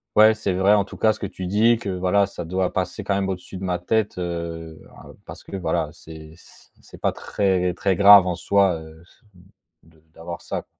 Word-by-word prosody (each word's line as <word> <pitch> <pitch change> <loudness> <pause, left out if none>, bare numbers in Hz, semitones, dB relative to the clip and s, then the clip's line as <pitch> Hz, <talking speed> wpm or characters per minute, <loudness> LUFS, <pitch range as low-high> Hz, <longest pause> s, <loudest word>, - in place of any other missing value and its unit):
ouais 110 +1 +6
c'est 110 -4 -2
vrai, 95 +3 +3
en 100 -1 +1
tout - - -12
cas, 110 -1 +3
ce 110 - -14
que - - -4
tu 95 -1 -7
dis, 110 +5 +3
que, 105 -3 -6
voilà, 95 +2 +1
ça 90 -3 -8
doit 95 +2 -2
passer, 95 +3 -3
quand 100 0 -1
même, 100 -1 -1
au-dessus 95 0 -6
de 95 - -8
ma 90 -1 -2
tête, 105 +2 -1
heu, 85 -2 -5 0.2
hein, - - -13
parce - - -11
que - - -9
voilà, 90 - -1
c'est 80 0 -13 0.5
c'est - - -16
pas - - +1
très, 90 -3 -1
très 95 +1 0
grave, 100 0 +8
en 90 - -1
soi, 95 +1 +2
heu, 80 0 -14 0.8
de 80 -1 -25
d'avoir 85 +1 -8
ça. - - -5
95 Hz, 210 wpm, -22 LUFS, 85-100 Hz, 0.8 s, grave